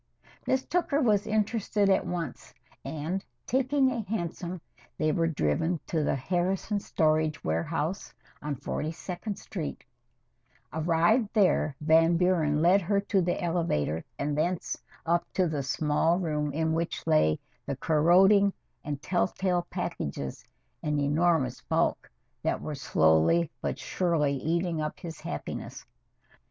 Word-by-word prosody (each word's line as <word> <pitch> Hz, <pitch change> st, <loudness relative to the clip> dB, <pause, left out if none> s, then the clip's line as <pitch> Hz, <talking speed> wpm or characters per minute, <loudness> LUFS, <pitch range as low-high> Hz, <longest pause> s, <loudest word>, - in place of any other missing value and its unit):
Miss 260 Hz, 0 st, +1 dB
Tooker 335 Hz, -5 st, +1 dB
was 215 Hz, -7 st, +2 dB
interested 215 Hz, -1 st, +1 dB
at 190 Hz, -1 st, +2 dB
once, 170 Hz, -6 st, -5 dB, 0.3 s
and, 160 Hz, +6 st, -3 dB, 0.2 s
taking 265 Hz, +1 st, +2 dB
a 240 Hz, -2 st, -2 dB
hansom, 180 Hz, -3 st, -4 dB, 0.4 s
they 155 Hz, 0 st, +2 dB
were 165 Hz, +2 st, +1 dB
driven 160 Hz, -, 0 dB
to 160 Hz, -3 st, -1 dB
the -, -, +1 dB
Harrison 185 Hz, -, -1 dB
Storage 155 Hz, -4 st, +1 dB
Warehouse 140 Hz, -, -2 dB, 0.3 s
on 150 Hz, -1 st, -3 dB
Forty 145 Hz, +3 st, -3 dB
second 180 Hz, +4 st, -5 dB
Street 170 Hz, -7 st, -6 dB, 0.9 s
Arrived 170 Hz, -, +2 dB
there, 180 Hz, -8 st, +3 dB
Van 165 Hz, +2 st, +4 dB
Buren 165 Hz, -4 st, +2 dB
led 185 Hz, +4 st, +5 dB
her 200 Hz, +3 st, +1 dB
to 200 Hz, -1 st, +1 dB
the 175 Hz, 0 st, 0 dB
elevator 165 Hz, -, 0 dB
and 145 Hz, +1 st, -1 dB
thence 170 Hz, +4 st, -1 dB, 0.3 s
up 170 Hz, +1 st, +2 dB
to 185 Hz, -2 st, +2 dB
the 150 Hz, -3 st, -2 dB
small 150 Hz, +4 st, +1 dB
room 150 Hz, -5 st, -1 dB
in 160 Hz, +2 st, 0 dB
which 165 Hz, +1 st, -2 dB
lay 155 Hz, -, +3 dB, 0.3 s
the 140 Hz, -, -1 dB
corroding 185 Hz, +8 st, +4 dB, 0.3 s
and 145 Hz, -1 st, -5 dB
tell 180 Hz, -1 st, +1 dB
tale 180 Hz, -2 st, -1 dB
packages 75 Hz, -, -4 dB, 0.4 s
an 150 Hz, -1 st, 0 dB
enormous 145 Hz, -2 st, +1 dB
bulk -, -, 0 dB, 0.3 s
that -, -, 0 dB
were 155 Hz, -, -5 dB
slowly 80 Hz, -, +3 dB
but -, -, -2 dB
surely 165 Hz, -6 st, 0 dB
eating 165 Hz, +3 st, -1 dB
up 150 Hz, 0 st, -4 dB
his 165 Hz, -4 st, -7 dB
happiness. -, -, -6 dB
165 Hz, 135 wpm, -28 LUFS, 150-190 Hz, 0.9 s, led